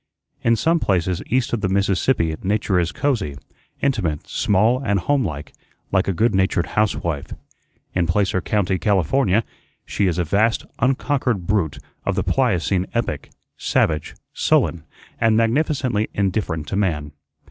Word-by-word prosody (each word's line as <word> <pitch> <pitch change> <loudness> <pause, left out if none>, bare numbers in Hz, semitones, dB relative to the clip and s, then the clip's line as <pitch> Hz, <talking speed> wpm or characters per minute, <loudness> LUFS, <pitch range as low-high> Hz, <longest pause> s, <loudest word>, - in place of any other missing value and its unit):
In 115 0 +3
some 165 +7 +2
places 90 - 0
east 125 0 0
of 115 - 0
the 95 - 0
Mississippi 95 -2 +1
nature 100 -1 +1
is 85 0 0
cosey, 105 - -1 0.5
intimate, 100 - 0
small, 115 +4 +2
and 100 -5 +1
homelike, 85 - -1 0.4
like 95 0 +2
a - - +2
good 110 +6 +1
natured 95 -2 +2
housewife. 85 -8 -1 0.6
In 90 -2 +1
Placer 95 +1 +1
County, 95 -2 0
California, 100 - +2 0.4
she 100 - 0
is 90 -2 0
a 90 - +1
vast, 105 +7 +1
unconquered 125 -5 0
brute 90 -6 0 0.3
of - - -1
the - - 0
Pliocene 90 +1 +1
epoch, 115 -11 -2 0.3
savage, 75 -1 0 0.2
sullen, 80 -2 +1 0.3
and 115 -1 +3
magnificently 120 -2 +1
indifferent 95 -6 -1
to - - -2
man. 80 -8 -1
100 Hz, 135 wpm, -21 LUFS, 85-115 Hz, 0.6 s, In